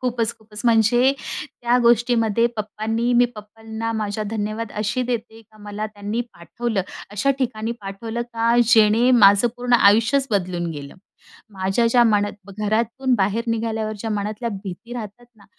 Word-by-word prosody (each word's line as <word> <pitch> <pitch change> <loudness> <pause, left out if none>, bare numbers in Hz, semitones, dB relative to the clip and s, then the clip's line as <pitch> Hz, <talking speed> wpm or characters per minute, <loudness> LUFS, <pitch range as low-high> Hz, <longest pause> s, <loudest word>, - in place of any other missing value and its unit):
खूपच, 235 -3 -1
खूपच. 210 -1 -12
म्हणजे 240 +3 +4
त्या 245 -5 -2
गोष्टीमध्ये 235 -1 +3
पप्पांनी, 220 +3 -2
मी 245 0 +5
पप्पांना, 220 +2 -6
माझा 215 -1 -3
धन्यवाद 215 0 -3
अशी 220 +5 -1
देते 230 -2 -4
का 215 0 -23
मला 205 +1 -5
त्यांनी 210 +2 -4
पाठवलं. 210 +4 -3 0.3
अशा 210 +7 0
ठिकाणी 235 -3 -2
पाठवलं 225 +4 -5
का, 230 +1 +2
जेणे 225 +2 +4
माझं 205 -1 +6
पूर्ण 245 0 -3
आयुष्यच 230 +7 +4
बदलून 180 -3 -1
गेलं. 145 -2 -8 0.6
माझ्या 195 +4 0
ज्या 240 +1 +4
मनात 205 -2 0
घरातून 230 +5 0
बाहेर 205 +4 0
निघाल्यावर, 220 -1 -1
ज्या 225 +1 -4
मनातल्या 210 +3 -3 0.2
भीती 200 +6 -8
राहतात 230 +1 -8
ना, 205 - -21
220 Hz, 140 wpm, -22 LUFS, 205-235 Hz, 0.6 s, माझं